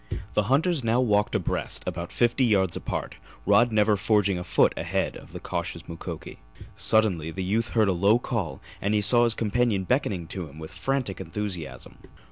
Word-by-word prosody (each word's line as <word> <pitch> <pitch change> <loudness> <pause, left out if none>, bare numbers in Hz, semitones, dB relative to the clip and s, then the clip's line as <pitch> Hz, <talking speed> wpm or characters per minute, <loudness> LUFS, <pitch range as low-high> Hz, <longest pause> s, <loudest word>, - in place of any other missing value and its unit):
The 105 - +1
hunters 155 +1 +2
now 115 +2 +2
walked 105 -4 +2
abreast, 85 - -1
about 85 0 -4
fifty 120 +2 +2
yards 95 -7 +2
apart, - - -4 0.3
Rod 105 +4 +4
never 105 -1 +3
forging 100 -2 +2
a - - -5
foot - - +3
ahead - - -2
of - - -12
the - - -7
cautious - - -4
Mukoki. 85 -1 -8 0.4
Suddenly 95 -8 +2
the 95 +3 -4
youth 110 +5 -1
heard 110 -2 +5
a 95 - +2
low 100 +6 +4
call 115 -9 -3 0.2
and 100 +2 +1
he 105 - +2
saw 120 +4 +5
his 115 -2 +1
companion 115 -2 +1
beckoning 100 - 0
to 90 -2 -5
him 70 - -14
with 80 0 -8
frantic 120 0 -2
enthusiasm. 80 -7 -6
105 Hz, 180 wpm, -26 LUFS, 90-115 Hz, 0.4 s, heard